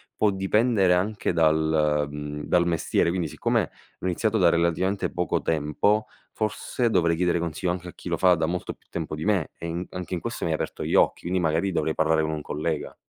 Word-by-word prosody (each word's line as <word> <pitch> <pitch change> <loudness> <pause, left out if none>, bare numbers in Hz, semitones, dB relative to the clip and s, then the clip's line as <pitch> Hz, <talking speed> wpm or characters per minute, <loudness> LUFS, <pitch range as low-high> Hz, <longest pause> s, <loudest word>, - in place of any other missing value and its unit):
può 105 -2 +3
dipendere 95 0 +2
anche 100 +2 -1
dal 80 -2 +2
mhmm, 75 0 -6
dal 85 -1 +2
mestiere. 85 0 +1
Quindi, 85 -2 -1
siccome - - 0 0.3
ho - - -7
iniziato 110 +5 +1
da 90 -2 +6
relativamente 85 +4 +1
poco 90 -2 0
tempo, 80 +8 +1 0.3
forse 115 +2 -1
dovrei 85 -3 +3
chiedere 90 +1 +1
consiglio 85 +2 -2
anche 90 0 -5
a - - -11
chi 90 - -8
lo 85 - 0
fa 90 0 +5
da 80 0 0
molto 90 +1 -3
più - - -34
tempo 80 -2 -4
di 75 - -5
me. 100 -6 +1
E 85 - -6
in 85 +2 -3
anche 90 0 -4
in 85 - -3
questo - - -5
mi - - 0
hai - - +1
aperto - - -4
gli - - -1
occhi, - - +3
quindi 90 +1 -1
magari 85 +3 +1
dovrei 80 -2 0
parlare 80 0 +2
con 80 - -1
un 75 -1 -3
collega. 75 +1 -3
85 Hz, 215 wpm, -25 LUFS, 80-95 Hz, 0.3 s, da